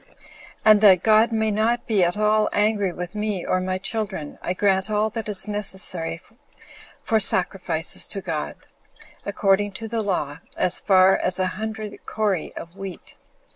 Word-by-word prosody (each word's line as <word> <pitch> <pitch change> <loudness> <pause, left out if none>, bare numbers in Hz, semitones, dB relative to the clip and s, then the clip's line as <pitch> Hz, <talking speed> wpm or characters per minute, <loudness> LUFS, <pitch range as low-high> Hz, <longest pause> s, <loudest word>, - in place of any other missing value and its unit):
And 215 -1 +6
that 190 -4 +6
God 220 +1 +4
may 220 -1 0
not 225 +3 0
be 210 -5 +2
at 175 +3 0
all 215 0 +2
angry 205 -2 +1
with 175 0 -7
me, 210 -4 -3
or - - 0
with 185 - -3
my 185 0 -2
children, 190 -6 -3
I 180 - -2
grant 190 +1 +1
all 215 +1 0
that 220 0 -5
is 205 0 +4
necessary 190 -5 0 0.8
for 220 -2 +1
sacrifices 180 -4 +1
to 195 - -2
God, 165 -6 -4 0.7
according 200 0 +1
to 225 +3 -7
the 225 0 -2
law, 165 -7 -3 0.2
as 180 - +1
far 190 -1 +4
as 180 0 -1
a 185 - 0
hundred 215 -1 -7
cori 205 -6 -2
of 170 +2 -9
wheat. 195 -2 -8
200 Hz, 165 wpm, -22 LUFS, 185-215 Hz, 0.8 s, And